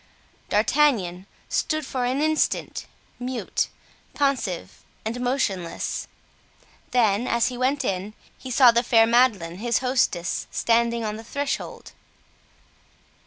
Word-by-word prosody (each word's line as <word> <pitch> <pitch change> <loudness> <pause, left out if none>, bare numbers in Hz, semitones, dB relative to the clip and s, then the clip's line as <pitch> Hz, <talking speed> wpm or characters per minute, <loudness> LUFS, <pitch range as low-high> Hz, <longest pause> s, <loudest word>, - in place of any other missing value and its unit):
D'Artagnan 210 -6 +2 0.2
stood 310 -2 -1
for 255 -2 -2
an 260 +4 0
instant, 310 0 0 0.3
mute, 250 0 -2 0.5
pensive 270 - -1 0.2
and 230 +3 -3
motionless; 220 -9 -2 0.8
then, 230 -1 +2
as 235 +1 +2
he 250 - -6
went 265 +3 0
in, 195 +3 -3 0.2
he 260 - -9
saw 250 0 +7
the 235 0 +3
fair 225 -2 +5
Madeleine, 225 -8 +2
his 235 +3 +1
hostess, 250 -9 0
standing 235 0 +1
on 210 0 -3
the 225 - -9
threshold. 280 +4 -4
235 Hz, 115 wpm, -24 LUFS, 210-260 Hz, 0.8 s, saw